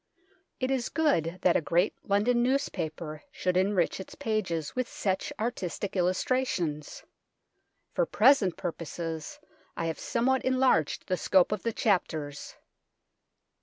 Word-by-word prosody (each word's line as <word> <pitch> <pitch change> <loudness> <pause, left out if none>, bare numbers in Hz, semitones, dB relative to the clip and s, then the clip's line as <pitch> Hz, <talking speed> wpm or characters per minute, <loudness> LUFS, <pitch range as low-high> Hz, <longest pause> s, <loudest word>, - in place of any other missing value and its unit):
It 255 0 0
is 255 -3 0
good 185 - +1
that 180 - +4
a - - +3
great 175 +5 +2
London 215 +5 +2
newspaper 170 - -2 0.2
sh6uld 180 -1 +1
enrich 185 -2 +2
its 190 - -9
pages 180 -9 -2
with 255 -1 0
such 190 -2 -2
artistic 205 -4 -3
illustrations. 180 - -1 0.9
For - - +1
present 220 -7 +4
purposes 165 - -5 0.4
I 165 - -1
have 165 -1 -3
somewhat 260 +2 +1
enlarged 255 - +2
the 185 - -1
scope 185 +1 +3
of 210 -3 -1
the 230 - -1
chapters. 160 -9 -1
190 Hz, 125 wpm, -29 LUFS, 165-245 Hz, 0.9 s, that